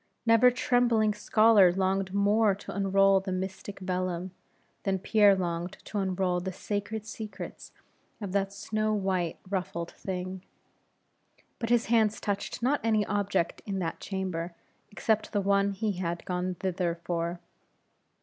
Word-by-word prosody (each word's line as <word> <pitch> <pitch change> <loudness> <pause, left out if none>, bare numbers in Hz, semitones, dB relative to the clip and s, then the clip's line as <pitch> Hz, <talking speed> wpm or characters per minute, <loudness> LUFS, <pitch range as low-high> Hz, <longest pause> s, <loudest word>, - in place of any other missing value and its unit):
Never 230 +2 +6
trembling 240 -3 +2
scholar 210 -2 +5
longed 190 +1 0
more 200 +1 +3
to 195 - -9
unroll 195 0 +4
the 190 0 -5
mystic 190 +2 -4
vellum, 185 -1 -2 0.5
than 195 -1 0
Pierre 205 +1 +5
longed 175 0 -2
to 210 - -3
unroll 185 -2 0
the 190 +1 -4
sacred 205 +3 -4
secrets 220 -1 -8 0.5
of 200 -4 -5
that 195 0 0
snow 215 +2 -1
white, 190 -4 -1
ruffled 185 -3 -3
thing. 185 0 -5 1.2
But 230 - -3
his 240 -1 +3
hands 220 -2 +2
touched 200 +3 -3
not 275 +3 +2
any 215 -2 +2
object 195 -4 -1
in 195 -1 -2
that 165 -3 -3
chamber, 180 -3 -4 0.3
except 220 +1 0
the 205 - +2
one 200 0 +3
he 215 +2 -1
had 170 -2 -3
gone 180 0 -2
thither 180 -2 -1
for. 170 0 -3
195 Hz, 140 wpm, -29 LUFS, 185-210 Hz, 1.2 s, Never